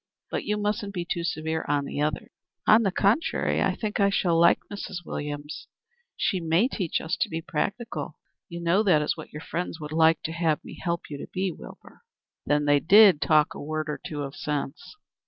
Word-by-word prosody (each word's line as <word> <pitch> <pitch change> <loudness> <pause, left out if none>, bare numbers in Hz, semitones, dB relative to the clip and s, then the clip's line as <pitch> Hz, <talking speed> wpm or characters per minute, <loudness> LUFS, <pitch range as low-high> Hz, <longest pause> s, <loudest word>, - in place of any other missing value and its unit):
But - - -2
you 210 0 0
musn't 205 -1 -2
be 175 -1 -2
too 170 0 -2
severe 160 -1 -2
on 145 -1 +1
the 145 - -4
others." 150 -1 -2 0.3
"On 215 +2 +6
the 195 -4 +1
contrary, 210 - +1
I - - +1
think 215 -1 -3
I 200 0 +4
shall 180 -3 +1
like 170 +1 +6 0.2
Mrs. 180 -3 -6
Williams. 145 0 -6 0.5
She 190 - 0
may 165 +7 +2
teach 190 - -2
us 160 +2 -2
to - - 0
be 160 - -3
practical. 200 +9 -3 0.3
You 170 -1 -6
know 170 +4 +3
that 180 -8 +3
is - - 0
what - - -10
your 150 - -8
friends 175 -1 -4
would 150 -1 -7
like 160 0 +3
to 160 - -3
have 165 -2 0
me - - -10
help 170 -1 -2
you 145 - -5
to - - -7
be, 190 0 -1
Wilbur." - - -13 0.5
"Then 145 +1 +2
they 145 0 +4
did 195 -1 +7
talk 155 -1 +3
a - - -8
word 155 +1 -3
or - - -6
two 145 -2 -4
of 140 0 -7
sense?" 145 - -4
165 Hz, 210 wpm, -26 LUFS, 150-195 Hz, 0.5 s, did